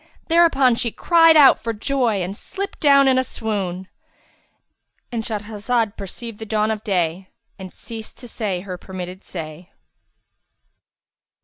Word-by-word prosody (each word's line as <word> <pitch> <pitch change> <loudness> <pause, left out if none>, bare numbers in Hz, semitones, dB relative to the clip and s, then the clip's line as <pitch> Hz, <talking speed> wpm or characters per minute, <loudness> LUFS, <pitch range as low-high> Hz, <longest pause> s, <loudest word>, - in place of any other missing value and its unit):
Thereupon 325 -7 +4
she 235 0 -1
cried 330 +2 +5
out 275 -3 +7
for 230 0 -3
joy 225 -3 0
and 185 +3 -5
slipped 395 - -6
down 280 -2 +5
in 260 -1 +4
a - - +1
swoon;—And 195 -7 -4 1.4
Shahrazad 220 +1 -2
perceived 210 +3 -8
the 220 - -6
dawn 215 0 +1
of 215 -1 -4
day 185 -3 -1 0.3
and 190 -1 -8
ceased 225 -2 -10
to 245 - -10
say 205 -6 -3
her 185 -2 -7
permitted 185 0 -8
say. 165 +1 -8
220 Hz, 130 wpm, -21 LUFS, 190-255 Hz, 1.4 s, out